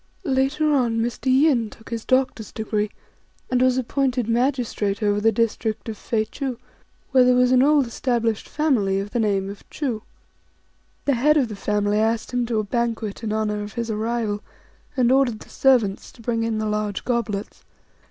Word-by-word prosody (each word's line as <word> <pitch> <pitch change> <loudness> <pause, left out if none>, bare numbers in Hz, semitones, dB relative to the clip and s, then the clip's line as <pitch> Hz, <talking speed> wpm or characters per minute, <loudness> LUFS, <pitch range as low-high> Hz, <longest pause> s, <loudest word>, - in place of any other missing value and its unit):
Later 280 +3 +1
on 240 -5 +2
Mr. 240 +3 -2
Yin 260 -5 +3
took 225 +2 -15
his 230 -1 -4
doctor's 255 -4 +1
degree, 215 -1 -2 0.6
and 250 -1 +2
was 255 0 +3
appointed 255 -1 0
magistrate 230 -4 0
over 205 0 +2
the 225 +1 +4
district 225 0 -1
of 220 - -4
Fei 220 +1 -1
ch'iu, 265 0 -4 0.5
where 260 -2 +6
there 250 0 +4
was 250 0 +4
an 255 -1 +5
old 290 0 +4
established 230 -2 -1
family 230 -11 +1
of 200 +1 -5
the 240 - -1
name 200 -3 +1
of 200 0 -8
Chu. 250 -8 -3 1.0
The 280 - +3
head 295 +5 +3
of 260 -6 +2
the 210 - -6
family 210 +1 0
asked 225 +2 0
him 245 -1 0
to 230 -2 -1
a 215 - +1
banquet 225 -1 -2
in 215 - -2
honour 215 -1 -1
of 205 -1 -7
his 235 -1 -3
arrival, 220 -1 -1 0.6
and 250 -1 +4
ordered 260 -5 +2
the - - -13
servants 240 -8 +2
to 235 - -16
bring 230 0 0
in 225 -1 -1
the 215 - -1
large 210 -2 -2
goblets. 230 -5 -2
230 Hz, 180 wpm, -23 LUFS, 215-255 Hz, 1.0 s, where